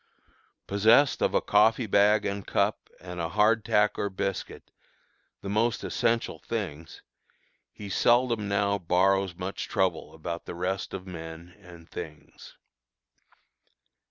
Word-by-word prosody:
Possessed 110 +7 +4
of - - +1
a - - +3
coffee 110 +3 +3
bag 105 +1 +3
and 100 -1 -3
cup - - 0
and 90 -1 -8
a 85 -1 -2
hard 105 +3 +3
tack 105 0 +2
or 100 - -1
biscuit, 95 0 -5 0.7
the 100 - -7
most 110 +4 0
essential 115 0 -1
things, 85 -9 -6 0.7
he 105 - -9
seldom 120 +1 +2
now 100 0 +1
borrows 95 +1 +2
much 95 +2 -5
trouble 90 -5 -1
about 85 +1 -6
the - - -6
rest 95 +3 -3
of 95 -1 -7
men 85 -1 -9
and 85 -4 -14
things. 75 -2 -10
100 Hz, 130 wpm, -27 LUFS, 90-105 Hz, 0.7 s, Possessed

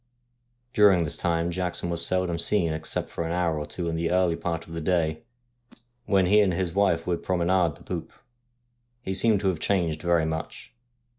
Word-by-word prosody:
During 100 -7 +5
this 80 0 +1
time 85 0 0
Jackson 90 -1 -2
was 85 0 0
seldom 90 -1 0
seen 85 -2 +1
except 80 0 -4
for - - -3
an 80 - -3
hour 85 -3 0
or 75 - -5
two 85 - -4
in 85 - -2
the 85 0 -1
early 90 -2 +2
part 85 -1 -4
of 80 - -11
the 85 - -4
day, 80 -2 0 0.9
when 95 -2 +3
he 105 +4 +5
and 95 -4 +2
his 90 -2 -2
wife 95 -4 +2
would 85 -1 -1
promenade 90 -3 +1
the - - -17
poop. - - -5 0.9
He 95 - -3
seemed 105 0 +3
to 100 - 0
have 85 -4 -2
changed 85 -4 0
very 85 -2 +2
much. 80 0 -5
85 Hz, 195 wpm, -26 LUFS, 80-95 Hz, 0.9 s, During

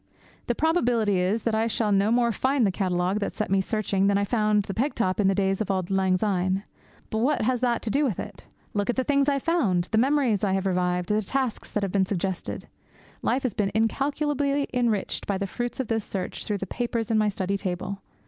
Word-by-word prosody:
The 240 - +1
probability 240 - +2
is 195 +5 0
that 230 - 0
I 220 +1 +2
shall 220 -2 0
no 200 +1 +3
more 235 0 +3
find 260 +3 +1
the 195 - +2
catalogue 185 +1 0
that 200 - -3
set 215 - -2
me 195 0 +4
searching 200 -1 0
than 200 0 +3
I 200 - +1
found 210 -2 +2
the 195 - -5
peg 265 +8 -1
top 185 -4 0
in 200 - +4
the 195 - +3
days 195 0 +1
of 215 - -2
auld 185 -1 -1
lang 190 -1 +2
syne; 190 -1 0 0.5
but 220 - 0
what 265 +3 +1
has 250 +2 +1
that 240 -2 0
to 225 - -2
do 285 +6 +2
with 235 - -1
it? - - -8 0.3
Look 205 +1 -1
at 245 - +2
the 260 - +1
things 280 +1 +2
I - - +2
have 275 - -2
found, 205 - +1
the 220 - +3
memories 255 -6 +2
I 195 -2 +2
have 195 0 0
revived, 180 -1 0
the 210 +1 +2
tasks 255 +3 -2
that 210 - -2
have 195 - -1
been 190 -1 +2
suggested! 190 -2 -3 0.5
Life 260 - 0
has 250 -5 -1
been 200 -1 0
incalculably 280 +4 0
enriched 235 -5 0
by 200 - 0
the 200 - -2
fruits 240 +6 -4
of 260 - 0
this 225 -1 -1
search 190 -3 -4
through 210 - -1
the 195 - -4
papers 230 +2 -2
on 220 - +3
my 215 -1 +3
study 195 0 -2
table. 190 +1 -4
210 Hz, 235 wpm, -26 LUFS, 195-245 Hz, 0.5 s, me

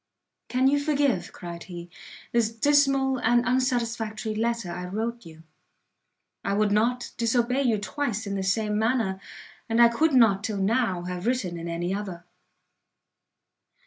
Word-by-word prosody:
"Can 255 +1 +2
you 285 +1 +3
forgive," 285 - 0
cried 170 -1 -8
he, 175 -2 -8 0.4
"the 230 -1 +1
dismal 275 -1 +3
and 240 +1 +3
unsatisfactory 235 -4 -1
letter 230 -3 -1
I 180 +1 -5
wrote 225 +2 -4
you? 160 0 -14 1.0
I 200 - 0
would 210 0 +2
not 240 +4 +1
disobey 240 +3 +1
you 235 -5 +2
twice 225 0 -3
in 200 - -4
the 195 - -2
same 210 +2 0
manner, 220 -4 0 0.5
and 225 +1 +1
I 235 0 +8
could 305 +6 +1
not 210 -5 +5
till 215 -2 -2
now 195 -2 +1
have 180 +3 -4
written 195 -9 -1
in 165 - -6
any 170 +2 -2
other." 190 -4 -5
225 Hz, 145 wpm, -26 LUFS, 195-250 Hz, 1.0 s, I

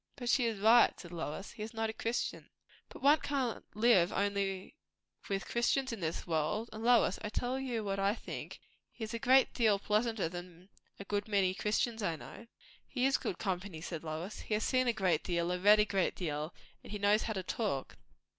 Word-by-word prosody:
"But 245 -3 -4
she 245 0 +3
is 225 -2 -2
right," 225 +4 +5
said 175 - -10
Lois. 170 +2 -5
"He 220 - -11
is 220 +2 -6
not 225 0 -1
a - - -14
Christian." 230 +2 -3 0.4
"But - - -12
one 295 +2 +6
can't 265 -5 -2
live 215 -6 +4
only 200 +2 -1 0.5
with 195 -2 -1
Christians 240 +2 +1
in 225 - -5
this 165 -2 -3
world. 170 +8 -1
And, 215 +1 -7
Lois, 235 -5 +4
I'll 210 - -2
tell 245 +4 -2
you 245 -4 -2
what 195 -1 -2
I 200 +2 +2
think; - - -7 0.3
he 225 - -8
is 220 - -5
a 230 - -2
great 260 +3 +4
deal 220 -4 +3
pleasanter 215 -1 0
than 175 +1 -9 0.3
a 200 - -7
good 205 +1 -2
many 195 -3 +2
Christians 220 +3 -1
I 170 -5 0
know." 220 +8 -11 0.4
"He 255 -1 0
is 270 0 +3
good 175 - -4
company," 185 -3 -3
said 165 -1 -6
Lois. 165 +6 -5
"He 215 - -2
has 215 - -1
seen 255 -1 +2
a - - +5
great 185 -7 +1
deal 170 -1 0
and 180 0 -3
read 210 +1 +7
a 210 - +5
great 195 -3 0
deal, 155 -2 -3 0.3
and - - -12
he 210 - -3
knows 205 +2 +3
how 220 - -2
to 190 -2 -3
talk. 190 - -2
205 Hz, 210 wpm, -33 LUFS, 180-230 Hz, 0.5 s, read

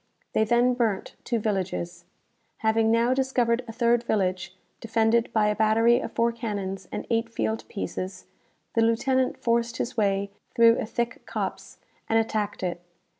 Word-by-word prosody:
They 220 - +3
then 240 +2 +3
burnt 225 -6 -1
two 240 - -1
villages. 185 -5 -3 0.6
Having 220 0 +3
now 230 +2 +3
discovered 255 -2 +1
a - - -5
third 235 +1 +2
village, 185 -4 -1 0.2
defended 225 +1 +1
by 220 -2 +2
a 210 0 +2
battery 225 +2 +4
of - - -5
four 235 0 +2
cannons 200 -5 -4
and - - -4
eight 230 0 +1
field 225 -1 -2
pieces, 190 -2 -5 0.5
the 230 - +2
lieutenant 255 +3 +2
forced 235 0 0
his 250 +2 -3
way 200 -2 +1 0.2
through 230 0 +6
a - - -3
thick 235 +2 -3
copse, - - -4 0.3
and 225 - +3
attacked 215 -3 -1
it. 175 -1 -2
225 Hz, 155 wpm, -26 LUFS, 205-235 Hz, 0.6 s, through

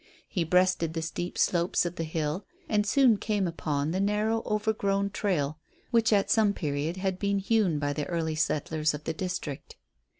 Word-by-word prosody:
He 180 - -1
breasted 180 -1 +2
the 165 - -2
steep 175 +2 -4
slopes 175 0 +2
of 175 0 -3
the 165 - -3
hill 155 +3 -2 0.2
and 210 -1 +1
soon 250 -1 +5
came 205 -3 0
upon 150 -3 -2
the 185 - -1
narrow 210 +3 +1
overgrown 200 -2 0
trail 155 -8 -1 0.3
which 230 -2 +3
at 200 -2 +3
some 215 -3 +4
period 150 0 -2
had 190 -1 -2
been 200 0 +1
hewn 195 -4 +2
by 145 0 -1
the 145 0 -3
early 165 -2 -1
settlers 155 0 0
of 150 - -8
the 160 - -2
district. 160 -5 -5
180 Hz, 175 wpm, -28 LUFS, 155-205 Hz, 0.3 s, soon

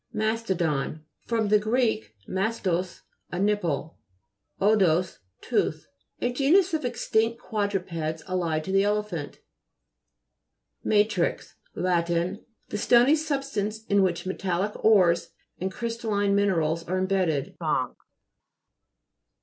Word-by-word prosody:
MA'STODON 180 -9 -1 0.2
fr. 230 -1 +1 0.2
gr. 215 +4 0 0.5
mastos, 190 -3 -1 0.3
a 175 - -3
nipple, 180 -6 -1 0.6
odous, 185 -4 +3 0.2
tooth. - - -1 0.3
A 245 - -1
genus 330 +8 +3
of 315 - 0
extinct 230 -2 0
quadrupeds 180 -7 -2
allied 170 -4 -1
to 190 - -4
the 195 0 +4
elephant. 205 -7 -2 1.4
WA'TRTX 210 -4 +1 0.2
Lat. 175 -2 +1
The 185 +6 -3
stony 245 +7 +5
substance 275 -8 -2
in 200 -2 +3
which 180 -2 0
metallic 190 +1 -1
ores 180 -6 +4 0.3
and 190 +1 -2
crystal 230 +1 -4
line 200 -1 +2
minerals 170 -5 +1
are 185 +2 -1
imbedded. 185 -7 0
195 Hz, 100 wpm, -26 LUFS, 175-220 Hz, 1.4 s, stony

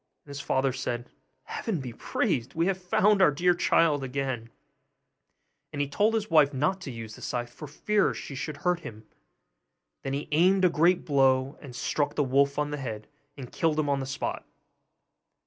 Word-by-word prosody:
And 145 - -12
his 140 0 -5
father 135 -1 0
said, 120 -2 -4 0.3
'Heaven 215 -8 -3
be 125 -3 -6
praised! 115 +1 -2
we 165 +1 +1
have 190 0 -1
found 195 +3 +3
our 185 - +7
dear 175 +5 +2
child 165 -4 +2
again'; 130 -3 -3 1.2
and 145 - -6
he 145 - +1
told 210 +10 +1
his 215 -1 -1
wife 150 -5 +4
not 170 +8 0
to 145 - -6
use 115 -2 -8
the - - -12
scythe 120 -1 -4
for 150 - -9
fear 205 +7 +1
she - - -7
should 145 +2 -5
hurt 180 -1 +2
him. 110 -8 -10 1.0
Then 135 - -4
he 140 +2 -3
aimed 185 +5 +4
a - - +6
great 170 +2 +2
blow, 135 -1 +2
and 130 -5 -10
struck 145 +3 -1
the 145 - +2
wolf 140 +1 +2
on 150 0 -1
the 150 - -3
head, 110 -6 -6 0.3
and 130 -3 -8
killed 155 -2 0
him 150 -2 0
on 140 -1 +1
the 135 - -4
spot! 135 - -3
145 Hz, 190 wpm, -27 LUFS, 130-170 Hz, 1.2 s, our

